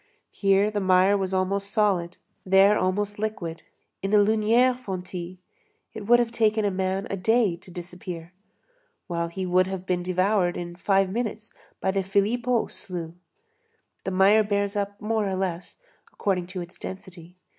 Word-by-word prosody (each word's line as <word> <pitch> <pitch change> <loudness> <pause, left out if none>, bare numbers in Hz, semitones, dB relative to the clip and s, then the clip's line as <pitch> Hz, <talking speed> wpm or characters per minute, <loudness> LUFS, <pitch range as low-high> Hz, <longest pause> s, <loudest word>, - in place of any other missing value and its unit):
Here 200 +1 +2
the 210 - -1
mire 190 +1 +4
was 190 -2 -1
almost 195 +1 0
solid, 195 -5 +1 0.3
there 195 +2 +5
almost 205 +2 -1
liquid. 190 -7 -4 0.4
In 195 - -2
the 210 - +4
Lunière 220 +4 +4
fontis, 185 -6 -6 0.6
it 210 -2 -7
would 240 +1 +7
have 240 -1 0
taken 220 -2 +2
a 200 - +1
man 190 +1 -1
a - - 0
day 215 0 +2
to 185 - -17
disappear, 175 -1 -8 0.7
while 170 -2 -2
he 185 +3 -4
would 185 +1 +3
have 190 -1 -5
been 180 -1 0
devoured 185 0 +1
in 175 0 -6
five 195 +1 +1
minutes 220 0 -4 0.3
by 190 - 0
the 195 0 0
Philippeaux 225 +5 0
slough. 170 -3 -7 0.9
The - - -2
mire 195 +3 +5
bears 200 0 -1
up 200 0 -3
more 215 -1 0
or 190 - -1
less, 185 - -4 0.3
according 180 -3 -1
to 185 0 -5
its 175 +1 -11
density. 180 -2 -9
195 Hz, 160 wpm, -25 LUFS, 180-210 Hz, 0.9 s, would